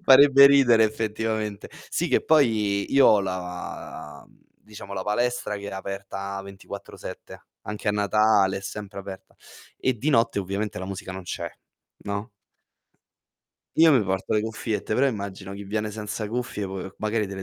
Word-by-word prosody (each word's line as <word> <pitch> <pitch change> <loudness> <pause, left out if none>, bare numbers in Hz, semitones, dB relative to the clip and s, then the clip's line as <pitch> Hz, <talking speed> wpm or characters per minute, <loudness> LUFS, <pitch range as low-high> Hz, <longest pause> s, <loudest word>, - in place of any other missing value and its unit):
farebbe 140 -2 +8
ridere 130 -5 +6
effettivamente. 110 -1 -2 0.2
Sì - - -1
che - - +3
poi 110 -10 +2
io 135 0 +7
ho 105 - +6
la 90 -5 -6
mhmm, - - -26 0.3
diciamo 105 -1 -10
la 95 -1 -3
palestra 120 +1 -1
che 100 0 -7
è - - -7
aperta 100 0 -5
24/7 100 0 -10 0.2
anche 105 0 -6
a 105 - +3
Natale, 105 -1 +3
è - - -4
sempre 100 0 -7
aperta, 95 -1 -9 0.4
e 130 - +1
di 135 +7 -2
notte 115 -6 +3
ovviamente 100 +1 -3
la - - -4
musica 95 0 -6
non 95 0 -7
c'è, 90 - -4 0.6
no? 100 +3 -3 1.5
Io 160 0 +7
mi 125 -7 +4
porto 95 0 -1
le 105 - +2
cuffiette, 110 -1 -3
però 130 +6 +3
immagino 100 -5 -4
chi 100 +1 -8
viene 105 +1 -2
senza 105 0 -4
cuffie 115 -3 -3
po 95 0 -5
ehm, 95 +1 -8
magari 110 0 0
te 100 - -7
le 95 - -5
105 Hz, 165 wpm, -25 LUFS, 100-110 Hz, 1.5 s, farebbe